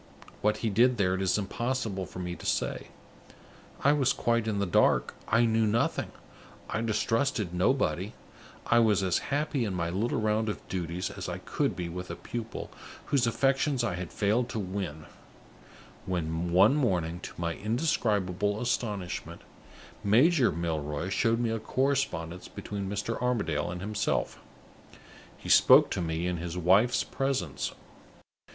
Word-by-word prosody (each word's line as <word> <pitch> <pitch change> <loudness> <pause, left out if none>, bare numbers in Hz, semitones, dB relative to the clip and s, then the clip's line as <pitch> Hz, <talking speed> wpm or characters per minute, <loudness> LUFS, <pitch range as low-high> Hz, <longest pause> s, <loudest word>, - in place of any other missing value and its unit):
What 105 0 +2
he 110 - +1
did 120 +4 +4
there, 95 -3 +2
it 95 - -2
is 95 +1 +2
impossible 105 -2 -2
for - - -11
me 90 -1 -4
to - - -12
say. - - -1 1.0
I 145 - +5
was 135 -3 +2
quite 115 -1 0
in 105 -2 0
the 100 - +1
dark; 90 - +3
I 115 +2 +4
knew 110 -1 +2
nothing: 115 +3 0 0.6
I 110 - -2
distrusted 115 -2 0
nobody; 95 - +1 0.5
I 120 - +4
was 105 -4 +3
as 95 -2 +2
happy 145 -2 0
in 100 -4 -2
my 85 -1 -1
little 110 +6 0
round 110 0 +1
of 105 - -6
duties 90 -1 -3
as - - -6
I - - -3
could - - -1
be 90 -1 -4
with 90 +2 -6
a - - -4
pupil 115 -1 -6 0.4
whose 130 -4 +4
affections 135 +2 +1
I 110 -6 0
had 90 -1 -5
failed 110 +4 +1
to 110 - -3
win, 90 -6 -4 1.0
when, 85 -1 -2
one 95 +7 +6
morning, 90 - 0
to - - -8
my 85 -1 -1
indescribable 105 - 0
astonishment, 100 -8 -3 0.6
Major 130 - +4
Milroy 80 0 -3
showed 115 +4 +2
me 120 -2 0
a 115 - -1
correspondence 110 -9 -1
between 100 -2 -5
Mr. 115 +3 -3
Armadale 105 -12 0
and 90 0 -5
himself. 105 +1 -1 1.0
He - - -11
spoke - - +7
to - - -1
me 80 0 -2
in 90 -1 -1
his 85 +1 -5
wife's 95 +8 +4
presence. 125 - -2
105 Hz, 155 wpm, -29 LUFS, 90-120 Hz, 1.0 s, spoke